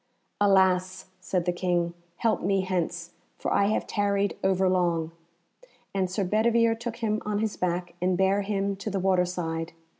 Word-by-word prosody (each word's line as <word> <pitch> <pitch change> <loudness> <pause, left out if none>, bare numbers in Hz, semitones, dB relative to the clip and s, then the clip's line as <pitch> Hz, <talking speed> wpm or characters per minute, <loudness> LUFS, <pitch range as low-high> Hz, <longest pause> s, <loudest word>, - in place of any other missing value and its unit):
"Alas!" 190 -2 +2
said 180 -1 -1
the 180 - +2
King, 175 -1 0 0.2
"help 225 +4 +1
me 195 -1 +1
hence, 175 -2 -2 0.3
for - - -2
I 200 - +3
have 215 - 0
tarried 200 -1 0
overlong;" 180 -4 +2 0.8
and 190 -2 0
Sir 195 +2 -1
Bedivere 225 +4 +3
took 230 0 -5
him 220 -2 -1
on 210 -1 -1
his 215 0 -1
back, 175 -1 -2
and 180 0 +1
bare 190 +2 +3
him 200 0 -1
to 200 - -4
the 195 -1 -1
water 185 -1 +3
side. 165 -2 -4
190 Hz, 160 wpm, -27 LUFS, 180-205 Hz, 0.8 s, I